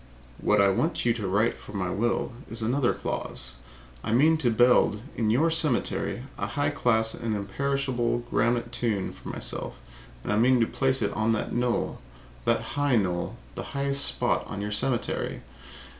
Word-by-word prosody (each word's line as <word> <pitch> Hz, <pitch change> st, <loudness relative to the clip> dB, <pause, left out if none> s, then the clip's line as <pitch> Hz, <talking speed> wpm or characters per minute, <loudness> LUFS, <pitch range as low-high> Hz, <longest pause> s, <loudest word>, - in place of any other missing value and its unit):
What -, -, +2 dB
I 100 Hz, 0 st, +5 dB
want 155 Hz, -, 0 dB
you 120 Hz, -, +4 dB
to 110 Hz, -4 st, -4 dB
write 105 Hz, +5 st, +2 dB
for -, -, -13 dB
my 95 Hz, -2 st, -2 dB
will, 120 Hz, +4 st, 0 dB, 0.2 s
is 115 Hz, 0 st, -4 dB
another 125 Hz, +3 st, +2 dB
clause. -, -, -4 dB, 0.5 s
I -, -, -2 dB
mean 155 Hz, +7 st, +5 dB
to 130 Hz, -6 st, +2 dB
build, 120 Hz, -2 st, +4 dB
in 110 Hz, -2 st, 0 dB
your 150 Hz, +9 st, +3 dB
cemetery, 155 Hz, -5 st, +1 dB, 0.2 s
a -, -, -1 dB
high 145 Hz, 0 st, 0 dB
class 110 Hz, -5 st, +1 dB
and 115 Hz, -2 st, -3 dB
imperishable 125 Hz, +3 st, -1 dB
granite 120 Hz, +1 st, +1 dB
tomb 110 Hz, -5 st, -1 dB
for -, -, -10 dB
myself. -, -, -4 dB, 0.5 s
I 105 Hz, -, +1 dB
mean 125 Hz, +3 st, +4 dB
to 115 Hz, -, +4 dB
place 130 Hz, +1 st, +1 dB
it 100 Hz, -, 0 dB
on 110 Hz, +1 st, +1 dB
that 110 Hz, -, -2 dB
knoll 120 Hz, 0 st, 0 dB, 0.5 s
that -, -, +2 dB
high 145 Hz, -3 st, +2 dB
knoll 90 Hz, -5 st, -1 dB, 0.2 s
the -, -, -5 dB, 0.2 s
highest 140 Hz, 0 st, +1 dB
spot -, -, +2 dB
in 105 Hz, -, -4 dB
your 105 Hz, +1 st, -3 dB
cemetery. 120 Hz, +4 st, -1 dB
120 Hz, 170 wpm, -27 LUFS, 110-135 Hz, 0.5 s, I